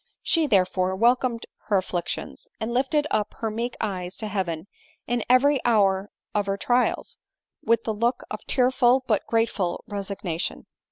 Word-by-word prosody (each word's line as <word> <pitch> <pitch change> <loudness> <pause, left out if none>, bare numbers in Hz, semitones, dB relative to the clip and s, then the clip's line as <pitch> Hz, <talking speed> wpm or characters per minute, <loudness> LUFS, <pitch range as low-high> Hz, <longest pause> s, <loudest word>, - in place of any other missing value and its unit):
She, 325 -3 +2
therefore, 185 -4 +2
welcomed 235 +2 +2 0.2
her 205 - +3
afflictions, 175 -2 -4
and 225 +2 -3
lifted 275 +4 +2
up 210 - 0
her 225 -1 -3
meek 235 +3 -3
eyes 185 -4 -3
to 215 - -4
heaven 185 -5 -2 0.4
in 240 -1 -1
every 265 +2 +4
hour 200 -4 +3 0.2
of 205 -1 0
her 195 0 0
trials, 245 +4 0 0.4
with 230 0 +2
the 220 - -1
look 235 +4 0
of 215 - -3
tearful 255 0 +3
but 215 -5 0
grateful 215 -6 0
resignation. 200 -4 -4
220 Hz, 150 wpm, -25 LUFS, 195-245 Hz, 0.4 s, every